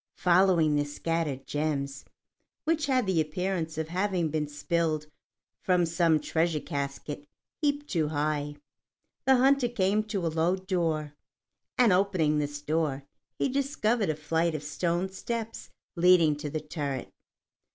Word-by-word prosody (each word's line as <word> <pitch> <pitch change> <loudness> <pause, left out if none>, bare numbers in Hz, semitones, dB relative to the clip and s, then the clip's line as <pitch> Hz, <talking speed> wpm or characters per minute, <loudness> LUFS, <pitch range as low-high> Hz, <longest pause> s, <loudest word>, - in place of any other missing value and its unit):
Following 175 -4 +4
the 145 - +2
scattered 145 -2 -2
gems, 140 -2 -2 0.6
which 315 -2 0
had 255 -4 +2
the 185 -4 +2
appearance 165 0 -2
of 160 0 -3
having 180 -2 0
been 150 0 -1
spilled 155 +1 -1 0.6
from 180 -2 +3
some 165 -1 +2
treasure 160 +1 0
casket 145 0 -5 0.3
heaped 290 -1 0
too 165 - 0
high, 150 -1 -1 0.7
the 265 - +6
hunter 265 0 +4
came 205 -2 +1
to 200 -5 -2
a - - +2
low 165 +3 +1
door, 165 -6 -1 0.6
and 240 -6 +5
opening 180 -6 +2
this 145 0 -3
door, 150 -3 -1 0.3
he - - +1
discovered 250 - 0
a 155 - 0
flight 160 +2 0
of 150 - -4
stone 170 +4 -1
steps 225 +3 -5 0.3
leading 170 -3 +5
to 150 0 -5
the 155 +1 -3
turret. 145 -4 -4
165 Hz, 140 wpm, -28 LUFS, 150-190 Hz, 0.7 s, the